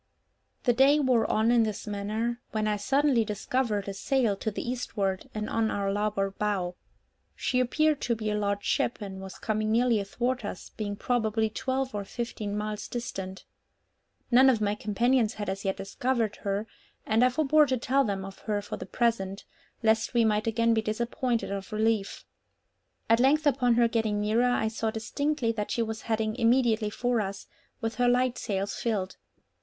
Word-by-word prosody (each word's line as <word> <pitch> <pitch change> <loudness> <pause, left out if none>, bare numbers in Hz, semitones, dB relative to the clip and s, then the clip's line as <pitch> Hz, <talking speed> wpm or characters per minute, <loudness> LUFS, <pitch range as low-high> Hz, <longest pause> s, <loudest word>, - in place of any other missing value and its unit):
The 245 - +3
day 275 +5 +5
wore 255 -5 +2
on 220 +2 +3
in 240 -1 +5
this 215 -3 -2
manner, 215 +4 -2
when 215 -1 0
I 210 - +1
suddenly 270 +2 +2
discovered 210 0 -1
a 200 - -3
sail 235 +1 +1
to 220 - -2
the 215 - -5
eastward, 205 -6 -2
and 215 0 -2
on 225 -1 +1
our 200 -1 -1
larboard 205 -1 -1
bow. 195 -4 0 0.6
She 250 - 0
appeared 305 +4 +2
to 235 - 0
be 215 -1 -2
a - - 0
large 205 -1 -1
ship, - - 0
and 195 -2 -7
was 190 -1 -8
coming 215 -1 -1
nearly 235 -1 +3
athwart 240 +5 -2
us, 200 -3 -6
being 205 -2 -4
probably 220 -1 0
twelve 260 +3 -2
or 205 -1 -3
fifteen 210 -1 -4
miles 210 0 -3
distant. 195 -6 -5 0.9
None 260 +2 +7
of 240 -4 +3
my 205 -1 +1
companions 230 +3 +1
had 205 -2 -4
as 195 +1 -4
yet 195 - 0
discovered 225 +2 -1
her, 200 +1 -2 0.4
and 220 +3 +3
I 250 - +6
forbore 300 +3 +4
to 260 -1 +1
tell 270 +3 +2
them 195 -5 -2
of 195 0 -10
her 210 -2 -1
for - - -5
the - - -8
present, 205 -5 0 0.4
lest 220 +2 +2
we 235 -1 +4
might 215 0 +1
again 230 +1 +2
be 220 - +2
disappointed 235 +1 -1
of 195 +1 -5
relief. 215 -1 0 0.8
At 230 +1 +4
length 290 +5 +4
upon 255 -4 +3
her 235 0 +4
getting 220 -2 0
nearer, 220 +4 +2
I 220 -2 +1
saw 220 0 -2
distinctly 240 +3 -1
that 210 -2 -3
she 235 - 0
was 220 -1 -5
heading 220 -1 -1
immediately 230 -3 +3
for 245 +1 0
us, 195 -1 -5 0.4
with 225 0 -1
her 245 - +3
light 250 0 +2
sails 200 -2 -2
filled. 200 -5 -2
220 Hz, 180 wpm, -28 LUFS, 205-245 Hz, 0.9 s, None